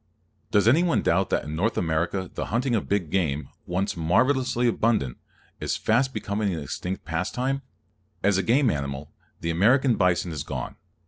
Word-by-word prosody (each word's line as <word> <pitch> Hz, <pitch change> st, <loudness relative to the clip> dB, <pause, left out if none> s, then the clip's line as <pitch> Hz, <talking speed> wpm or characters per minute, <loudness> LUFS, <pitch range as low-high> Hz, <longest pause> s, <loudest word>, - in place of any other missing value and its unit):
Does 105 Hz, +1 st, +3 dB
anyone 165 Hz, +8 st, +4 dB
doubt 95 Hz, +3 st, +2 dB
that -, -, +1 dB
in 75 Hz, +1 st, -5 dB
North 105 Hz, +8 st, 0 dB
America 85 Hz, +3 st, 0 dB
the -, -, -3 dB
hunting 120 Hz, +5 st, 0 dB
of 110 Hz, -, -1 dB
big 95 Hz, -6 st, 0 dB
game, 75 Hz, -6 st, 0 dB, 0.2 s
once 95 Hz, +3 st, -1 dB
marvelously 125 Hz, -, +2 dB
abundant, 110 Hz, -, +1 dB, 0.4 s
is -, -, -1 dB
fast 130 Hz, +4 st, +2 dB
becoming 105 Hz, -2 st, -2 dB
an -, -, -4 dB
extinct 90 Hz, +6 st, -5 dB
pastime? 125 Hz, +11 st, -1 dB, 0.6 s
As 100 Hz, -1 st, +3 dB
a -, -, +3 dB
game 125 Hz, +3 st, +3 dB
animal, 70 Hz, 0 st, -4 dB, 0.3 s
the 85 Hz, -, -1 dB
American 120 Hz, +8 st, +4 dB
bison 90 Hz, -2 st, +2 dB
is 75 Hz, -3 st, -4 dB
gone. -, -, -5 dB
100 Hz, 165 wpm, -25 LUFS, 85-120 Hz, 0.6 s, anyone